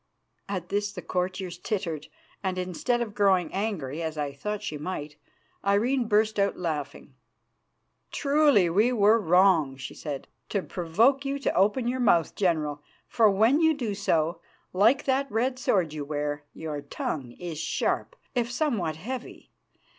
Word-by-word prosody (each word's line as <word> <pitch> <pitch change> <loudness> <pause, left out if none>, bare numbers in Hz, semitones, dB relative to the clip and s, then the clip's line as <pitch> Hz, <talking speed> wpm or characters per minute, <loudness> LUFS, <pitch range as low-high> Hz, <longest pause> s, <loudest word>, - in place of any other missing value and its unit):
At 185 -3 -4
this 205 0 -1
the 185 -4 -8
courtiers 180 -1 -3
tittered, 180 -8 -3 0.3
and, 190 -2 -2
instead 185 +7 -1
of 220 -3 -3
growing 190 -5 +2
angry, 170 -8 -2
as 160 -1 -3
I 145 -1 -2
thought 210 +9 -4
she 150 - -4
might, 150 -3 -5 0.5
Irene 235 +5 +2
burst 215 0 +2
out 200 0 +1
laughing. 150 -5 -4 1.0
"Truly 285 - +4
we 210 +9 +3
were 220 -1 +4
wrong," 180 -7 +4
she 130 - -7
said, 145 -3 -6 0.2
"to 200 - -1
provoke 225 +11 +2
you 275 0 -2
to 280 - -1
open 210 +6 +2
your 255 +1 -1
mouth, 175 -9 +3
General, 155 -6 0 0.3
for 225 -2 +4
when 225 +10 +4
you 320 -1 +4
do 235 -7 -2
so, 170 -4 0 0.3
like 225 +9 +4
that 270 0 +1
red 250 +4 0
sword 180 -10 +1
you 150 -2 -4
wear, 145 0 -3
your 155 -2 -5
tongue 140 -2 -4
is 170 -1 -6
sharp, 335 - -1 0.2
if 240 -2 0
somewhat 230 - 0
heavy. 245 +10 -7
195 Hz, 155 wpm, -27 LUFS, 160-230 Hz, 1.0 s, Truly